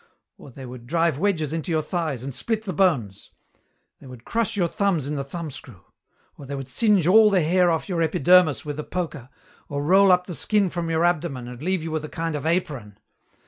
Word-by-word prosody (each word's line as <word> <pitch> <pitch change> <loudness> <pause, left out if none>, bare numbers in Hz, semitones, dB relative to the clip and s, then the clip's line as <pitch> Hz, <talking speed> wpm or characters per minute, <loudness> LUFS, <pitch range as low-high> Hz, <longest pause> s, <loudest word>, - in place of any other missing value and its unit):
Or - - -12
they 130 +1 -10
would 125 -1 -10
drive 165 -2 +1
wedges 165 -6 0
into 165 +1 -4
your 160 -2 0
thighs 155 -9 -3
and 135 0 -5
split 220 - -2
the 190 -4 -4
bones. 130 - 0 0.7
They - - -14
would 125 -2 -12
crush 230 -2 -1
your 175 -3 +2
thumbs 175 -6 0
in 150 - -3
the 140 -2 -2
thumbscrew. 140 - -8 0.6
Or 140 - -10
they 140 - -4
would 135 -1 -7
singe 210 - +2
all 210 +4 +6
the 190 -4 +2
hair 180 +3 +3
off 160 -1 -1
your 175 -4 -1
epidermis 160 0 +3
with 150 0 -5
a - - -3
poker, 160 -8 -5 0.4
or 145 0 -3
roll 190 +5 +5
up 180 0 +3
the 180 - -6
skin 200 +5 +1
from 170 -1 -3
your 165 +1 +1
abdomen 155 -8 -1
and 125 +1 -9
leave 185 0 -1
you 165 - -5
with 155 -1 -2
a 155 - -6
kind 165 -1 -3
of 150 +1 -3
apron. 140 - -2
160 Hz, 220 wpm, -23 LUFS, 140-180 Hz, 0.7 s, all